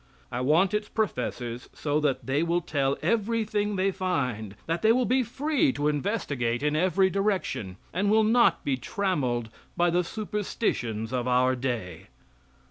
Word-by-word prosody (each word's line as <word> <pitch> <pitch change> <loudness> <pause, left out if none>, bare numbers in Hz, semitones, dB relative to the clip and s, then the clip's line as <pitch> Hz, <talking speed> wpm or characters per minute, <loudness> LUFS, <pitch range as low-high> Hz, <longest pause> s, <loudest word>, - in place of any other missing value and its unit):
I 120 - -2
want 165 +9 +3
its 210 0 -1
professors 125 - -3
so 150 0 -1
that 145 -3 0
they 135 +3 +1
will 170 +1 +1
tell 140 -4 0
everything 215 -2 0
they 195 +1 +1
find; 125 - -2
that 165 +1 -1
they 220 - +5
will 250 +2 +3
be 255 +2 +3
free 280 +5 +1
to 145 - -1
investigate 145 - -1
in 150 0 +1
every 185 +3 +3
direction, 190 - -1 0.2
and 200 +3 +1
will 220 +1 +5
not 235 +3 +3
be 135 -2 +1
trammeled 130 - -1 0.3
by 175 0 +3
the 180 +1 +2
superstitions 170 - -2
of 125 -1 -1
our 125 +1 +3
day. 120 -10 -4
170 Hz, 155 wpm, -27 LUFS, 125-210 Hz, 0.3 s, they